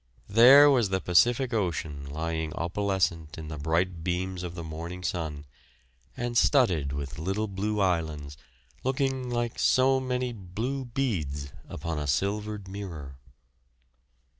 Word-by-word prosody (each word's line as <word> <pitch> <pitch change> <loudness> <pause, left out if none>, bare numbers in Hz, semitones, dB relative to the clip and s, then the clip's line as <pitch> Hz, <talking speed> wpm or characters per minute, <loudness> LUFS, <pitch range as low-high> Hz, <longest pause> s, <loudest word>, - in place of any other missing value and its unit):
There 125 +7 +9
was 120 -7 +3
the 95 0 0
Pacific 120 +8 +3
Ocean 80 -9 -2
lying 80 +1 -3
opalescent 85 -3 -1
in 80 -1 -7
the 75 -1 -6
bright 80 +3 0
beams 90 +1 -2
of 90 -1 -6
the 85 - -5
morning 85 +3 -6
sun, 80 -5 -3 0.7
and 120 0 -3
studded 95 - +3
with 70 0 -5
little 95 +6 -1
blue 105 +2 -2
islands, 80 -6 -1 0.5
looking 130 -1 -1
like 120 -1 -2
so 130 +1 +4
many 125 -1 -2
blue 115 +7 -4
beads 80 - -2 0.2
upon 80 0 -4
a 75 - -3
silvered 100 +6 -1
mirror. 85 -9 -7
95 Hz, 130 wpm, -28 LUFS, 80-115 Hz, 0.7 s, There